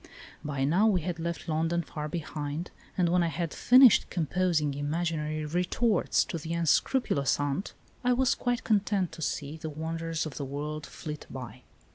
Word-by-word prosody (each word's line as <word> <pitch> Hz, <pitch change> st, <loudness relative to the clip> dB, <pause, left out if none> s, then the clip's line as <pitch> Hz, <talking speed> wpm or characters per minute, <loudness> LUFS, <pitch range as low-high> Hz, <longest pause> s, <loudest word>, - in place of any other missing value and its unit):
By 140 Hz, -2 st, -2 dB
now 175 Hz, +10 st, +4 dB
we 190 Hz, -5 st, +3 dB
had 170 Hz, 0 st, -3 dB
left 170 Hz, +1 st, -4 dB
London 165 Hz, +2 st, 0 dB
far 150 Hz, -1 st, -5 dB
behind, 155 Hz, 0 st, -4 dB, 0.3 s
and 180 Hz, -2 st, +3 dB
when 180 Hz, +1 st, +3 dB
I 170 Hz, -, +2 dB
had 165 Hz, +1 st, -3 dB
finished 255 Hz, -3 st, +6 dB
composing 170 Hz, -3 st, 0 dB
imaginary 155 Hz, +1 st, -2 dB
retorts 180 Hz, +6 st, +1 dB
to 165 Hz, -, -4 dB
the 160 Hz, +2 st, -4 dB
unscrupulous 165 Hz, -, +2 dB
aunt 145 Hz, +6 st, -2 dB, 0.3 s
I 250 Hz, -, +3 dB
was 255 Hz, 0 st, +3 dB
quite 245 Hz, -1 st, -1 dB
content 200 Hz, -4 st, +1 dB
to 165 Hz, 0 st, -10 dB
see 150 Hz, 0 st, -3 dB
the 160 Hz, 0 st, -5 dB
wonders 165 Hz, +1 st, -3 dB
of 155 Hz, -, -7 dB
the 145 Hz, -, -3 dB
world 150 Hz, +3 st, -4 dB
flit 150 Hz, -2 st, -7 dB
by. 125 Hz, -2 st, -8 dB
165 Hz, 165 wpm, -29 LUFS, 150-180 Hz, 0.3 s, finished